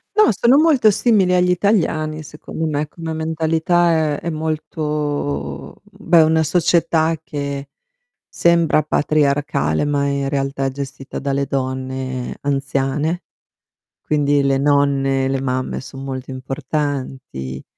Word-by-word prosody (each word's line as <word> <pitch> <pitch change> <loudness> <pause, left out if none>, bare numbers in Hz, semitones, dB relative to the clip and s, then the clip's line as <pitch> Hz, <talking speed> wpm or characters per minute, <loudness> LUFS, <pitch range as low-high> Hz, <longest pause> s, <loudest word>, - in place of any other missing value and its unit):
No, 425 - +6
sono 240 +7 +4
molto 295 -8 +5
simili 200 -4 +3
agli 180 0 +3
italiani 160 -5 0
secondo 155 +2 -6
me, 150 -1 -1
come 165 0 -6
mentalità 160 0 +1
è - - -6
è 170 - -4
molto 150 - -3
beh 170 -1 +2
è 160 - +8
una 160 0 +3
società 165 0 +2
che 140 -2 -5 0.6
sembra 170 -2 +3
patriarcale 145 - +1
ma 145 -1 0
in 140 -1 -1
realtà 135 -1 -1
è 135 - 0
gestita 135 0 -6
dalle 140 0 -1
donne 130 -1 -3
anziane. 140 +4 -1 0.8
Quindi 145 -1 +2
le 135 0 +2
nonne, 140 -1 +2
le 135 0 -1
mamme 130 -1 -2
son 135 +1 -9
molto 130 -1 -5
importanti. 130 - -4
145 Hz, 120 wpm, -19 LUFS, 135-160 Hz, 0.8 s, è